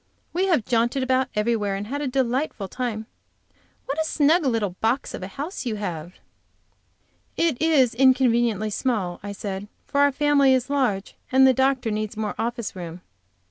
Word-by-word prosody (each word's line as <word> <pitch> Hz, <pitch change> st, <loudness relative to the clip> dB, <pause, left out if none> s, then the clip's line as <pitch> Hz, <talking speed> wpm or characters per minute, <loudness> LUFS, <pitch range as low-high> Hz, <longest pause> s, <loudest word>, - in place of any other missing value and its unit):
"We 370 Hz, +3 st, +1 dB
have 315 Hz, -, +2 dB
jaunted 240 Hz, +3 st, +1 dB
about 260 Hz, +1 st, +2 dB
everywhere, 210 Hz, -2 st, 0 dB
and 200 Hz, +1 st, -4 dB
have 285 Hz, +6 st, -4 dB
a 290 Hz, -, -1 dB
delightful 255 Hz, -4 st, -1 dB
time. 225 Hz, -1 st, -4 dB, 0.8 s
What 285 Hz, +4 st, -1 dB
a -, -, +1 dB
snug 315 Hz, +1 st, +2 dB
little 225 Hz, -6 st, 0 dB
box 235 Hz, +5 st, 0 dB
of -, -, -6 dB
a 185 Hz, -, -5 dB
house 290 Hz, -, -6 dB
you 220 Hz, -, -1 dB
have!" 175 Hz, -4 st, -5 dB, 1.2 s
"It 325 Hz, -6 st, +1 dB
is 295 Hz, -7 st, +4 dB
inconveniently 240 Hz, -4 st, +3 dB
small," 205 Hz, -7 st, -1 dB
I 205 Hz, -, -6 dB
said, 200 Hz, 0 st, -5 dB, 0.2 s
"for 280 Hz, -, +1 dB
our 285 Hz, 0 st, +5 dB
family 280 Hz, -1 st, +4 dB
is 255 Hz, +2 st, -2 dB
large 240 Hz, -9 st, 0 dB, 0.2 s
and 265 Hz, +1 st, +6 dB
the 260 Hz, -, +6 dB
doctor 265 Hz, -3 st, +1 dB
needs 215 Hz, 0 st, -3 dB
more 215 Hz, -1 st, -2 dB
office 235 Hz, -3 st, -3 dB
room." 175 Hz, -1 st, -7 dB
240 Hz, 170 wpm, -24 LUFS, 210-275 Hz, 1.2 s, and